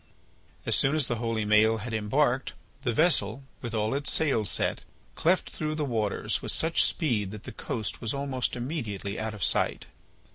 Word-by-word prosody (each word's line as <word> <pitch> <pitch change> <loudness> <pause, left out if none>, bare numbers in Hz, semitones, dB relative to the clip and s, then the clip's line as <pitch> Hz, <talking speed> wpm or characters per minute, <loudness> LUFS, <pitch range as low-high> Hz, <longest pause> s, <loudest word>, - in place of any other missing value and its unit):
As - - +5
soon 135 +3 +3
as 155 -4 +2
the 120 - -1
holy 115 -2 -1
Maël 110 +1 +4
had 120 - -5
embarked, 125 +4 +1 0.3
the 120 - 0
vessel, 135 - +2 0.2
with 115 -2 -4
all 110 +1 0
its 140 +1 0
sails 130 - +2
set, - - 0 0.3
cleft 175 +3 +1
through 155 -1 -3
the 150 -1 -1
waters 110 -6 -1
with - - 0
such 165 +1 +3
speed 115 - +1
that 105 +1 -9
the 125 - -7
coast 110 -1 -4
was 115 - -1
almost 140 -2 -1
immediately 115 - -4
out 110 -1 -3
of 100 - -5
sight. - - +2
120 Hz, 180 wpm, -28 LUFS, 110-140 Hz, 0.3 s, As